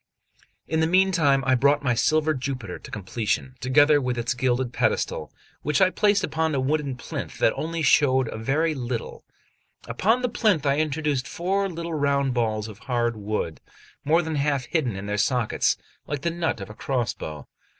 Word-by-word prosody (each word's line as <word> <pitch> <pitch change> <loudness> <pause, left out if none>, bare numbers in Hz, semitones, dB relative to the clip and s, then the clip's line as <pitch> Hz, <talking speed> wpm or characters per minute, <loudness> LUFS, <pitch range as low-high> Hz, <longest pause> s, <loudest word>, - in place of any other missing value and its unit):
XLI - - -9
IN 160 - +3
the 160 - +3
meantime 170 -7 +3
I 130 - +3
brought 140 +3 +3
my 125 -3 +2
silver 155 +6 +2
Jupiter 130 -8 -5
to - - -12
completion, 105 +5 -2
together 145 +3 +4
with 125 -1 -2
its 120 +1 0
gilded 125 0 0
pedestal, - - -1 0.3
which 150 -1 0
I 185 -1 +5
placed 205 -1 +2
upon 160 -1 0
a - - +1
wooden 140 0 0
plinth - - -6
that 115 - +3
only 165 +1 -3
showed 130 -4 +4
a - - -6
very 155 +8 +1
little; 120 -4 -5 0.6
upon 215 - +1
the - - +3
plinth 215 - +1
I 140 +1 +2
introduced 150 -3 -1
four 195 +3 -1
little 170 -1 -5
round 140 -3 +1
balls 110 -3 -1
of 105 -1 -11
hard 120 -2 -1
wood, 105 -6 -3 0.4
more 165 +4 +3
than 160 -2 -3
half 140 -2 0
hidden 125 - -1
in 95 +1 -6
their 105 0 -2
sockets, 125 0 +1 0.3
like 145 -2 -3
the 170 - 0
nut 165 -9 -2
of 95 +1 -7
a - - -9
crossbow. 110 - -3
140 Hz, 180 wpm, -25 LUFS, 120-160 Hz, 0.6 s, I